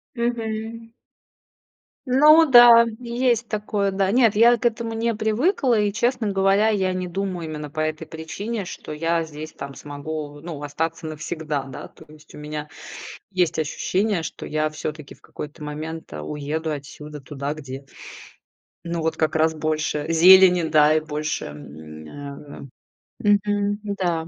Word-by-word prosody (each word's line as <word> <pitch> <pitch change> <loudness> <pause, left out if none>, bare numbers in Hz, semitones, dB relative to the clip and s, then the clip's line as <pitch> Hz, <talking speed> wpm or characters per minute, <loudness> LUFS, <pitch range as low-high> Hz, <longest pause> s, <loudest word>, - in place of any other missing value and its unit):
Мгм. 230 -1 -3 1.2
Ну 300 +4 +6
да, 240 -2 +9
есть 240 -1 0
такое. 210 -2 -1
Да. 195 0 0
Нет, 230 -2 +4
я 235 +2 +6
к 235 - -7
этому 230 -1 0
не 230 +1 0
привыкла, 240 - +1
и, 205 -1 +1
честно 240 -1 0
говоря, 195 +2 +3
я 190 -3 +1
не 185 0 -3
думаю 185 -2 -3
именно 150 -1 -6
по 155 +2 -7
этой 155 0 -2
причине, 195 +6 -5
что 155 - -8
я 165 +2 0
здесь 155 0 -9
там 140 0 -8
смогу, 145 0 -7
ну, 160 -3 -7
остаться 160 +3 -3
навсегда, 155 -2 -4
да, 135 - -9
то - - -17
есть 155 0 -17
у - - -10
меня 150 0 -6 0.6
есть 180 -4 +1
ощущение, 185 +4 -1
что - - -7
я 155 0 0
всё-таки 155 -1 -6
в - - -22
какой-то 150 +1 -9
момент, 155 +2 -6
э, 75 - -6
уеду 150 - -3
отсюда 150 0 -8
туда, 140 +1 -4
где 135 -3 -8 1.0
ну, 170 -1 -3
вот 160 0 -1
как 155 0 0
раз 160 0 +3
больше 155 -1 -2
зелени, 180 +1 +7
да, 155 -1 +4
и - - +4
больше 155 - -4
мня, 80 - -10
эм 145 -1 -11 0.7
мгм, 205 0 -1
м-да. 180 -5 -2
165 Hz, 150 wpm, -23 LUFS, 150-210 Hz, 1.2 s, да